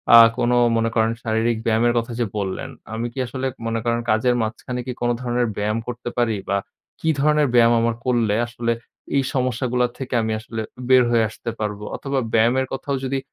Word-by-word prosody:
আ - - +12 0.2
কোনো 120 0 +2 0.2
মনে 115 0 +1
করেন 110 0 +3
শারীরিক 115 +1 +1
ব্যায়ামের 115 +1 +3
কথা 115 +1 -5
যে 120 - +2
বললেন, 95 -2 -3 0.2
আমি 115 +2 -2
কি 135 - -6
আসলে 130 +2 -3 0.2
মনে 115 0 -1
করেন 120 0 +1
কাজের 120 +3 +2
মাঝখানে 115 +3 -4
কি - - -1
কোন 120 - +1
ধরনের 120 -1 0
ব্যায়াম 105 +2 0
করতে 120 0 -4
পারি? 120 -2 +2
বা 100 - +2 0.4
কি 160 - +1
ধরনের 150 0 +3
ব্যায়াম 120 0 +6
আমার 115 0 +1
করলে 120 -4 +2
আসলে 120 0 -2 0.4
এই 140 - +3
সমস্যাগুলো 125 -1 +1
থেকে 135 -1 -5
আমি 110 0 -1
আসলে 110 0 -5 0.3
বের 130 -1 +7
হয়ে 115 -2 +4
আসতে 115 +2 -7
পারবো, 105 -1 -3
অথবা 135 -1 -2
ব্যায়ামের 120 +4 +3
কথাও 135 +1 -3
যদি 135 +1 -1
120 Hz, 190 wpm, -22 LUFS, 110-125 Hz, 0.4 s, আ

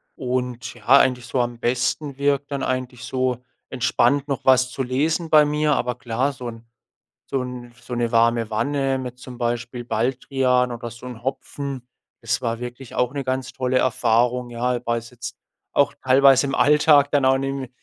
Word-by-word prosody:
Und 125 -2 -3
ja, 120 -3 -17
eigentlich 130 -2 +5
so 125 - -1
am 120 -1 -1
besten 130 +4 -1
wirkt 140 0 0
dann 140 - -2
eigentlich 130 -2 -3
so, 130 -1 -1 0.3
entspannt 130 +2 +1
noch 140 -3 -3
was 130 -1 +4
zu 130 - -3
lesen 155 +6 0
bei 155 -1 +6
mir. 150 0 +1
Aber 125 0 -1
klar, 125 +4 -1
so 125 -1 -7
'n 115 0 -9 0.6
so 135 - -1
'n 125 -1 -7
so 125 0 -7
'ne 120 -1 0
warme 115 -1 +3
Wanne 135 +4 0
mit 125 -1 -7
zum 125 -1 -10
Beispiel 120 0 -3
Baldrian 125 +2 0
oder 120 0 -6
so 120 +2 -11
'n 120 -3 -9
Hopfen, 135 0 -5 0.3
das 120 +2 -1
war 115 -1 -1
wirklich 125 +1 -8
auch 125 0 +1
'ne 140 -1 -3
ganz 130 0 -2
tolle 130 0 0
Erfahrung, 120 0 +1
ja? 120 +1 -1
Weil's 115 0 -2
jetzt 120 -1 -8 0.4
auch - - +2
teilweise 135 +1 +5
im 135 - -2
Alltag 150 -1 +5
dann 145 -2 +3
auch 130 0 +4
nimme 135 -1 -3
125 Hz, 180 wpm, -22 LUFS, 120-135 Hz, 0.6 s, bei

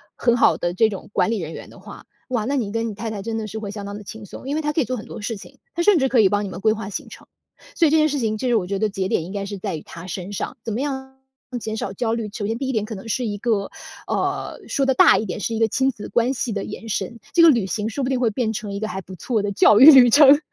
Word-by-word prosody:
很 240 -1 +2
好 245 - +4
的 175 0 -2
这 220 +4 +4
种 200 -3 -7
管 220 - +1
理 225 - -1
人 160 -3 -5
员 - - -9
的 - - -15
话， - - -12 0.2
哇， 240 -4 -1
那 275 +4 -1
你 225 -7 -1
跟 230 +1 -1
你 220 - -4
太 220 +2 -5
太 205 -2 -5
真 225 +1 -3
的 220 - -3
是 215 - -7
会 205 -2 -5
相 205 -1 -7
当 200 0 -6
地 210 - -10
轻 220 +2 -9
松。 230 - -10
因 285 - -1
为 315 - 0
他 300 -1 -1
可 300 - -1
以 285 - +2
做 255 - -2
很 220 - -7
多 - - -8
事 225 +3 -3
情， 270 +7 -14 0.2
他 345 - -1
甚 410 0 +5
至 265 - +2
可 260 -2 +2
以 195 - +5
帮 205 +1 0
你 - - -5
们 185 - -7
规 215 - +4
划 220 -3 -6
行 205 - -6
程。 - - -13 0.5
所 335 - +4
以 - - +1
这 320 - +5
件 310 0 +4
事 290 -1 -1
情， 220 -3 -1
其 255 - -2
实 240 - +2
我 200 - +1
觉 200 - -2
得 215 - +2
节 195 -2 -2
点 165 - 0
应 185 - -8
该 200 -1 -3
是 205 0 -5
在 190 -2 -4
于 155 - -6
他 170 +2 -11
身 185 +2 -6
上， 205 - -4
怎 225 - -4
么 220 - -2
样 265 -2 -5 0.4
减 220 -1 -4
少 205 - -3
焦 225 +2 -1
虑？ 230 -2 -3
首 210 -1 -4
先 225 +2 -1
第 270 - -2
一 - - +1
点 220 -4 -1
可 220 - -7
能 205 +3 -8
是 250 +2 -1
一 205 -2 -3
个 210 -3 -1 0.3
呃， - - -2
说 275 - 0
得 265 - +3
大 - - +6
一 220 - -2
点， 185 +1 -5
是 225 +3 -2
一 - - -2
个 225 - +4
亲 265 +5 +1
子 220 -5 -7
关 240 +2 +1
系 235 -2 -2
的 200 - -3
延 225 - -8
伸， 215 +2 -3
这 345 - +5
个 335 - +9
旅 235 -9 +3
行 210 +3 -2
说 270 +5 -3
不 255 - -1
定 260 - 0
会 245 -2 +2
变 220 0 -1
成 210 -1 -5
一 200 - -4
个 215 - -2
还 190 -1 -5
不 185 0 -11
错 220 +6 -1
的 200 0 -2
教 210 +1 +5
育 265 - +9
旅 250 -4 +8
程， 285 +2 +8
220 Hz, 360 characters per minute, -22 LUFS, 205-255 Hz, 0.5 s, 个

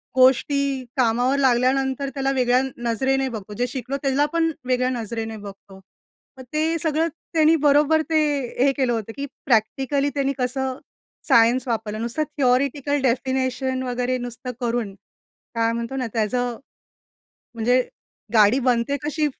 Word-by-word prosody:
गोष्टी 265 +1 +3
कामावर 245 +3 +2
लागल्यानंतर 265 +1 +2
त्याला 270 0 0
वेगळ्या 250 -2 +2
अ, 265 +1 -2 0.2
नजरेने 265 +3 +1
बघतो. 210 -3 -7
जे 245 +4 -1
शिकलो 260 +2 -4
त्याला 275 +2 +2
पण 330 -1 +2
वेगळ्या 255 0 +1
नजरेने 225 -2 -4
बघतो. 200 -1 -12 0.6
मग 260 - -8
ते 320 +2 +1
सगळं 320 0 +1 0.3
त्यांनी 320 0 +5
बरोबर 300 +2 +4
ते, 320 -1 +3 0.5
हे 280 - +4
केलं 255 -3 +1
होतं 225 -1 -3
की 280 - -3 0.2
प्रॅक्टिकली 270 +4 +1
त्यांनी 275 -1 0
कसं 260 +1 -2 0.5
सायन्स 235 +2 +4
वापरलं? 220 -2 -2
नुसतं 235 +7 -1
थियोरेटिकल 280 +2 +1
डेफिनेशन 260 0 0
वगैरे 250 0 -1
नुसतं 245 +1 -6
करून 235 -4 -1 0.6
काय 230 0 +2
म्हणतो 235 +3 -4
ना? 255 -2 -2
त्याचं 240 +2 -1 1.0
म्हणजे 245 +3 +2 0.5
गाडी 215 +3 +5
बनते 250 +2 +1
कशी? 305 0 0
255 Hz, 135 wpm, -23 LUFS, 235-275 Hz, 1.0 s, त्यांनी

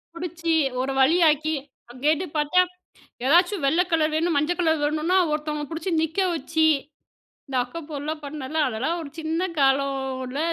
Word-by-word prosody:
பிடிச்சு 335 -1 -2 0.3
ஒரு 270 +1 -2
வழியாக்கி, 315 0 +3 0.4
அங்க 250 - -13
கேட்டப் 315 +1 +1
பாத்தா, 300 +5 +3 0.6
ஏதாச்சும் 350 +3 +3
வெள்ள 325 +6 +3
கலர் 310 -1 +2
வேணும், 330 0 +1
மஞ்சள் 345 +5 0
கலர் 320 -3 +2
வேணுன்னா 310 +5 +1
ஒருத்தவுங்கள 300 -1 -3
பிடிச்சு 330 +3 -3
நிற்க 320 +4 -2 0.2
வச்சி, 320 +2 0 0.8
இந்த 265 - -3
அக்கப்போர்லாம் 305 +1 -6
பண்ணல, 290 +1 -6
அதெல்லாம் 265 +9 -2
ஒரு 290 -3 -7
சின்ன 325 +3 -1
காலம்ல 270 -1 0
310 Hz, 135 wpm, -24 LUFS, 280-330 Hz, 0.8 s, வழியாக்கி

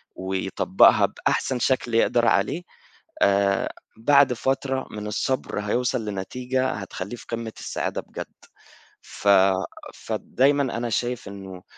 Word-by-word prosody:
ويطبقها 95 0 +3
بأحسن 130 -2 -1
شكل 125 -1 0
يقدر 120 +1 +3
عليه 105 - +1 0.6
آآ 100 0 +3 0.3
بعد 140 +3 +5
فترة 135 +2 -1
من 105 0 -6
الصبر 125 +2 -2
هيوصل 120 +2 -1
لنتيجة 125 +6 -2
هتخلّيه 100 0 -6
في - - -13
قمة 115 -1 -4
السعادة - - -3
بجد. - - -8 0.7
ف 100 - -3 0.7
فدايمًا 140 +2 +1
أنا 120 0 -2
شايف 120 +2 -2
إنّه 95 -2 -9
115 Hz, 110 wpm, -24 LUFS, 100-130 Hz, 0.7 s, بعد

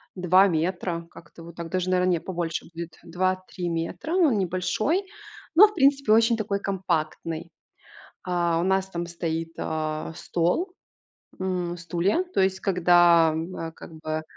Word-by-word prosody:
2 185 +2 +5
метра. 170 0 -2
Как-то 165 - -14
вот 170 0 -11
так. 170 -1 -6
Даже, 185 0 -1
наверно, 185 0 +2
не, 170 - +1
побольше 170 -3 -3
будет, 170 -1 -7
2-3 185 0 -2
метра, 170 - -3
но 360 -5 +4
он 230 - +1
небольшой, 195 - 0 0.5
но, 385 +7 +9
в 420 - -10
принципе, 275 -6 +4
очень 230 +1 +4
такой 200 -2 -2
компактный. 170 -3 -3 0.7
А, 175 -2 +1
у - - 0
нас 190 0 +1
там 175 -1 -4
стоит, 165 -1 -4
а, 155 0 -3
стол, 180 - -1 0.6
м, 180 -2 -2
стулья. 175 - 0
То - - +3
есть, 190 0 +1
когда, 175 -3 +5
м, 165 +4 -4
э, 165 0 -5
как 165 - -12
бы 155 0 -4
175 Hz, 155 wpm, -25 LUFS, 165-190 Hz, 0.7 s, но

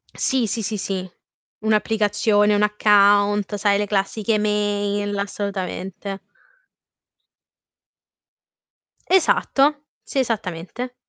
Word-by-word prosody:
Sì. 260 -4 0
Sì, 225 +3 -3
sì, 210 +2 -3
sì. 190 -1 -4 0.5
Un'applicazione, 210 -1 +2
un 205 - +2
account, 205 -1 +3
sai, 200 0 +2
le 205 - 0
classiche 205 +2 -1
email, 205 -1 -1
assolutamente. 195 -1 -5 2.9
Esatto, 300 -5 +2 0.2
sì, 275 - -3
esattamente. 225 0 -3
205 Hz, 80 wpm, -21 LUFS, 200-220 Hz, 2.9 s, account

